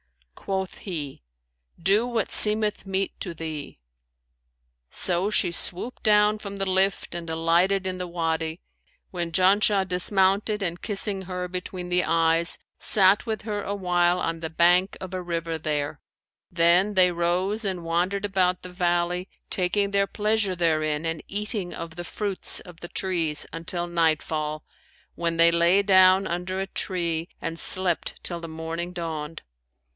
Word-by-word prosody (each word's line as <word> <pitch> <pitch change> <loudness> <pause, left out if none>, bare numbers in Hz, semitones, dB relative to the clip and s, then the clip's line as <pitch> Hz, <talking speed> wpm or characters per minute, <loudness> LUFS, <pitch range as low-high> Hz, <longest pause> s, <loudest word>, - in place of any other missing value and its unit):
Quoth 190 - -4
he, 150 - -6 0.6
"Do 200 +7 +3
what 230 -4 -2
seemeth 210 -1 +3
meet 195 0 -2
to 175 -3 -5
thee!' 155 - -6 1.1
So 180 +2 -1
she 185 -4 +2
swooped 190 +8 -1
down 210 0 +4
from 200 -1 -7
the 195 - -1
lift 190 -1 +1
and 170 -1 -6
alighted 170 +4 +2
in 185 -1 -3
the 180 - -3
Wady, 165 -1 -2 0.5
when 175 -2 -3
Janshah 195 +2 +3
dismounted 195 +3 +1
and 175 -1 -3
kissing 200 -2 0
her 180 -1 -4
between 180 0 -6
the 180 0 +2
eyes,[FN#549] 165 +1 0
sat 195 0 +5
with 220 -2 -3
her 210 -1 -3
awhile 180 -3 +1
on 165 -1 -2
the 160 -1 -4
bank 175 +4 +3
of 185 0 -8
a 185 - -3
river 165 -2 -3
there; 145 -1 -2 0.5
then 175 +4 +3
they 180 -1 +5
rose 180 +5 0
and 185 -4 -3
wandered 180 +4 0
about 185 -2 +1
the 180 - -8
valley, 180 0 -1 0.2
taking 200 +2 0
their 200 0 +2
pleasure 210 -2 0
therein 155 -2 0
and 165 -1 -2
eating 205 -2 -3
of 165 -1 -7
the 175 - -6
fruits 200 +2 0
of 175 -2 -13
the 175 - -8
trees, 170 -5 -1
until 170 +1 -2
nightfall, 155 -2 -1 0.5
when 170 -1 -2
they 165 0 +6
lay 170 +4 +4
down 190 -1 +5
under 180 +2 -3
a 195 - -2
tree 170 -3 -2
and 165 0 -5
slept 185 -3 +2
till 175 -1 -4
the 165 - -6
morning 165 +2 -5
dawned. 165 -3 -5
180 Hz, 150 wpm, -25 LUFS, 165-195 Hz, 1.1 s, they